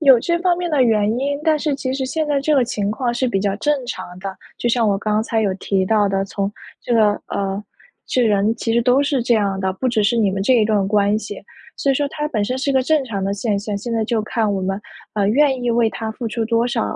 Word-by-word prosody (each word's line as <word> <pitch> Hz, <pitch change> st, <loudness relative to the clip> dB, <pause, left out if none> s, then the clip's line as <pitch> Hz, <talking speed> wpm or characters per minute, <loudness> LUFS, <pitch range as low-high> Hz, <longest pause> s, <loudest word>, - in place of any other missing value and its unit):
有 270 Hz, -5 st, +7 dB
这 340 Hz, +5 st, 0 dB
方 355 Hz, -1 st, +2 dB
面 350 Hz, -2 st, -2 dB
的 280 Hz, -4 st, +3 dB
原 215 Hz, -3 st, +3 dB
因， 285 Hz, +2 st, -1 dB
但 315 Hz, -1 st, +2 dB
是 295 Hz, -2 st, -1 dB
其 260 Hz, -1 st, -3 dB
实 265 Hz, -1 st, -2 dB
现 310 Hz, +4 st, -2 dB
在 280 Hz, -1 st, +1 dB
这 300 Hz, +2 st, +1 dB
个 260 Hz, -, +4 dB
情 205 Hz, -4 st, -2 dB
况 240 Hz, +2 st, -1 dB
是 255 Hz, +2 st, 0 dB
比 195 Hz, -4 st, 0 dB
较 200 Hz, -1 st, 0 dB
正 290 Hz, +1 st, 0 dB
常 185 Hz, -5 st, -7 dB
的。 190 Hz, 0 st, -6 dB, 0.2 s
就 240 Hz, -, 0 dB
像 235 Hz, -2 st, +2 dB
我 200 Hz, -1 st, +2 dB
刚 215 Hz, 0 st, 0 dB
才 225 Hz, -1 st, -1 dB
有 195 Hz, -2 st, +1 dB
提 190 Hz, 0 st, 0 dB
到 210 Hz, -2 st, +3 dB
的， 195 Hz, 0 st, 0 dB
从 200 Hz, +1 st, -3 dB, 0.3 s
这 240 Hz, -, -2 dB
个 215 Hz, -2 st, +5 dB, 0.2 s
呃， 195 Hz, +1 st, -2 dB, 0.4 s
这 250 Hz, -, +1 dB
人 210 Hz, 0 st, +2 dB
其 230 Hz, -1 st, -2 dB
实 235 Hz, 0 st, +3 dB
都 255 Hz, +3 st, +3 dB
是 280 Hz, -4 st, 0 dB
这 240 Hz, 0 st, +2 dB
样 200 Hz, -3 st, 0 dB
的， 190 Hz, 0 st, -1 dB
不 255 Hz, +6 st, -1 dB
只 225 Hz, -3 st, +1 dB
是 235 Hz, +3 st, +2 dB
你 210 Hz, -4 st, +2 dB
们 195 Hz, 0 st, -2 dB
这 255 Hz, +5 st, +3 dB
一 225 Hz, -, +4 dB
段 210 Hz, -2 st, +1 dB
关 205 Hz, 0 st, +2 dB
系， 205 Hz, -2 st, -8 dB, 0.3 s
所 275 Hz, -, +1 dB
以 -, -, +3 dB
说 285 Hz, +1 st, 0 dB
它 300 Hz, -1 st, -3 dB
本 215 Hz, -7 st, -1 dB
身 255 Hz, +4 st, -2 dB
是 275 Hz, +1 st, 0 dB
一 -, -, +1 dB
个 260 Hz, -1 st, +3 dB
正 305 Hz, +1 st, +2 dB
常 200 Hz, -5 st, -3 dB
的 200 Hz, -, -1 dB
现 205 Hz, -1 st, -1 dB
象。 205 Hz, 0 st, -4 dB
现 235 Hz, +3 st, -5 dB
在 220 Hz, -1 st, +1 dB
就 230 Hz, -1 st, 0 dB
看 215 Hz, -1 st, 0 dB
我 195 Hz, -, -1 dB
们， 195 Hz, +2 st, -2 dB, 0.3 s
呃， 205 Hz, -2 st, +1 dB
愿 265 Hz, +1 st, +2 dB
意 240 Hz, -, +1 dB
为 230 Hz, -1 st, +3 dB
它 220 Hz, 0 st, -5 dB
付 235 Hz, 0 st, -5 dB
出 225 Hz, +1 st, -2 dB
多 230 Hz, +1 st, +1 dB
少 240 Hz, -, -1 dB
225 Hz, 295 characters per minute, -20 LUFS, 205-260 Hz, 0.4 s, 有